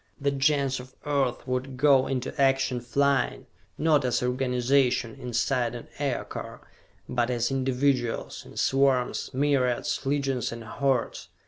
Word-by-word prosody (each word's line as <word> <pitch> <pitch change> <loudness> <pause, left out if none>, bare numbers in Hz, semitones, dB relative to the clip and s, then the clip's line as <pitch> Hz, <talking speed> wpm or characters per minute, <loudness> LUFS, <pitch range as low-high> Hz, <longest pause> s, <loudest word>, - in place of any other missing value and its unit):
The 140 0 +1
Gens 140 -1 +1
of 130 +1 -12
Earth 140 -4 0
would 130 +1 -3
go 135 -1 +4
into 130 -2 -2
action 135 -2 +2
flying, 140 +2 +1 0.3
not 155 -3 +3
as 125 -1 0
organizations, 125 -1 +1
inside 120 0 0
an 120 - -9
Aircar, 140 -4 -4 0.5
but 120 -1 0
as 120 0 0
individuals, 130 -2 0
in - - -14
swarms, 135 -2 +1
myriads, 130 -3 0
legions 135 -3 -1
and 115 0 -7
hordes. 130 +1 -1
130 Hz, 125 wpm, -27 LUFS, 125-140 Hz, 0.5 s, go